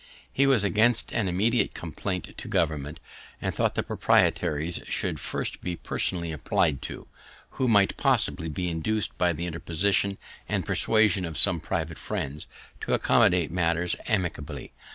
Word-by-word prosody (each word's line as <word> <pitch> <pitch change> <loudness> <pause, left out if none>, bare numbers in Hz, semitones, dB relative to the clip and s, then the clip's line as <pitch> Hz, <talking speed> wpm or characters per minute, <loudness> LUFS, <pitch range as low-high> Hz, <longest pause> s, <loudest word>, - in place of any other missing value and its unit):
He 140 +1 +3
was 130 -7 +4
against 110 +4 +2
an 115 -4 0
immediate 110 +7 +1
complaint 90 +2 -4
to - - -8
government, 75 -1 -1 0.4
and - - -2
thought - - 0
the - - 0
proprietaries 80 +3 +1
should - - -2
first - - -3
be 90 -1 -3
personally 85 0 -2
appli'd 75 -1 0
to, - - -7 0.4
who 130 - -1
might 100 -4 +3
possibly 105 - +1
be 90 +4 -3
induc'd 95 +6 -1
by 90 -1 +3
the 85 +1 -4
interposition 90 +4 0 0.3
and - - -1
persuasion 110 -4 +3
of 80 -3 -5
some 95 -4 +5
private 80 0 -3
friends, 70 +2 -4 0.3
to - - 0
accommodate 90 -3 +3
matters 85 0 +1
amicably. 80 - -3
90 Hz, 145 wpm, -26 LUFS, 80-100 Hz, 0.4 s, some